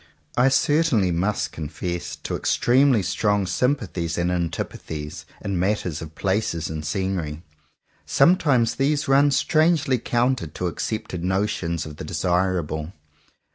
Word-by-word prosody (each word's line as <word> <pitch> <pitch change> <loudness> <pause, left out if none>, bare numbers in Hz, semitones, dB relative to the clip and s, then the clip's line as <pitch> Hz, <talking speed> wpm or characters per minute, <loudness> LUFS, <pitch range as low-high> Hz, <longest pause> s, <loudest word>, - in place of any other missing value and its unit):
I 125 +2 +4
certainly 145 - +3
must 95 +5 0
confess 85 - -5
to - - -2
extremely 125 -3 +3
strong 105 +2 +1
sympathies 95 - -1
and 85 0 +1
antipathies 80 -3 -4 0.2
in 100 - -2
the - - 0
matter 95 0 0
of 80 0 -7
places 95 -5 -1
and 80 -1 -4
scenery. 85 -2 -2 0.6
Sometimes 145 -10 +4
these 145 +2 0
run 140 +2 +5
strangely 155 -1 +2
counter 120 -4 0
to 75 +4 -5
accepted 90 0 -3
notions 90 -3 -1
of 75 -1 -9
the 90 - -6
desirable. 90 -2 -1
95 Hz, 125 wpm, -23 LUFS, 85-125 Hz, 0.6 s, run